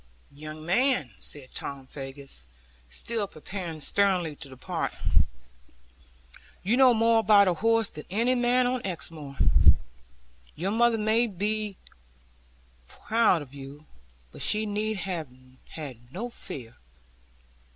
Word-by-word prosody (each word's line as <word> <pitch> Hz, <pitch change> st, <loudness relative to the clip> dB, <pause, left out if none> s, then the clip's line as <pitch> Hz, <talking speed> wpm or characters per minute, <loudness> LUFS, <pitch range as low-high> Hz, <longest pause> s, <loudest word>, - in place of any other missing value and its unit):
'Young 155 Hz, +2 st, -9 dB
man,' 240 Hz, -, +2 dB
said 140 Hz, -3 st, -5 dB
Tom 140 Hz, -1 st, -6 dB
Faggus, 135 Hz, -, -9 dB, 0.5 s
still 205 Hz, -, -2 dB
preparing 170 Hz, -1 st, -6 dB
sternly 180 Hz, -3 st, +1 dB
to 140 Hz, -1 st, -10 dB
depart, 130 Hz, -1 st, -3 dB, 1.7 s
'you 210 Hz, +6 st, +2 dB
know 260 Hz, -1 st, +7 dB
more 230 Hz, 0 st, +4 dB
about 205 Hz, -2 st, +6 dB
a 180 Hz, -, +4 dB
horse 225 Hz, +4 st, +2 dB
than 150 Hz, -4 st, -10 dB
any 230 Hz, +7 st, +2 dB
man 245 Hz, 0 st, +3 dB
on 250 Hz, -1 st, 0 dB
Exmoor. 160 Hz, -6 st, -6 dB, 1.2 s
Your 185 Hz, +5 st, -1 dB
mother 235 Hz, +1 st, +3 dB
may 220 Hz, +2 st, +3 dB
well 200 Hz, -5 st, -11 dB
be 210 Hz, 0 st, -1 dB, 1.1 s
proud 220 Hz, -8 st, +2 dB
of 135 Hz, -1 st, -16 dB
you, 140 Hz, +2 st, -10 dB, 0.5 s
but -, -, -11 dB
she 215 Hz, +1 st, +1 dB
need 215 Hz, +1 st, -1 dB
have 180 Hz, -6 st, -3 dB, 0.4 s
had 125 Hz, -6 st, -9 dB
no 235 Hz, -, -5 dB
fear. 120 Hz, -, -8 dB
190 Hz, 120 wpm, -27 LUFS, 150-225 Hz, 1.7 s, know